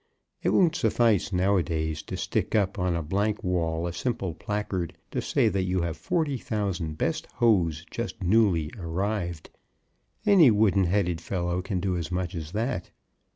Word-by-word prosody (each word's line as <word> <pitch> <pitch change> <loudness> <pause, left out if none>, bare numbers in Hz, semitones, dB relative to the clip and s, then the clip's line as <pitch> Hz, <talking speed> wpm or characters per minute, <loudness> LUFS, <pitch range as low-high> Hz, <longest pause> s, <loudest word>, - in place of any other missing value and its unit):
It - - +1
won't 170 -4 +4
suffice 115 - +2
now 95 +2 +2
a - - +3
days 80 -2 -2
to - - -6
stick - - -1
up 100 -1 +1
on 90 -1 +1
a 85 - -2
blank 100 +6 -1
wall 85 -2 0
a 85 - -3
simple 95 -4 -2
placard 95 -2 -3
to - - -1
say - - +2
that 95 -2 0
you 90 0 0
have 85 -1 -2
forty 140 - -1
thousand 95 -9 -2
best - - -1
hose 85 -9 +2
just 115 -1 -4
new 90 -5 +3
arrived. 90 -1 -3 0.7
Any 190 -9 +7
wooden 105 -3 +3
headed 90 -2 0
fellow 90 0 -2
can 95 0 -2
do 90 0 -1
as 85 +1 -4
much 90 0 -2
as 80 -3 -5
that. 110 -5 -2
95 Hz, 170 wpm, -27 LUFS, 85-105 Hz, 0.7 s, Any